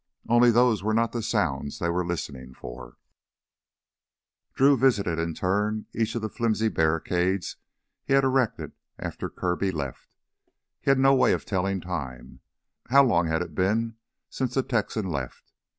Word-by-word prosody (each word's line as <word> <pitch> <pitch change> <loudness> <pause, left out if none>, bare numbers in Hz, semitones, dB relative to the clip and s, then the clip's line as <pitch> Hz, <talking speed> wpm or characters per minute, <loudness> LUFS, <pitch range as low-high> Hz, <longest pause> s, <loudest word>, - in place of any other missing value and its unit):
Only 120 +1 +5
those 120 -3 +3
were 110 +2 0
not 115 0 +2
the 120 - -3
sounds 70 -8 -1
they 85 - -1
were 90 +1 0
listening 70 -7 -5
for. - - -10 1.6
Drew 140 +1 +5
visited 105 -10 +2
in 85 -1 -2
turn 105 +3 -1
each 115 0 -1
of 115 - -3
the - - 0
flimsy 110 -1 0
barricades 90 +2 0 0.5
he - - -1
had 135 0 +5
erected 130 -3 0 0.3
after - - -5
Kirby 90 +2 -1
left. 70 -7 -6 0.7
He - - -1
had 135 - +5
no 135 +1 +5
way 130 - +4
of - - -3
telling 95 -1 -1
time. 75 -9 -6 0.5
How 140 +3 +6
long 85 -10 +2
had 80 +2 0
it 85 -3 -10
been 110 +6 0 0.3
since 130 -2 -3
the 135 - +2
Texan 110 -4 -1
left? 70 -8 -6
100 Hz, 155 wpm, -26 LUFS, 85-120 Hz, 1.6 s, How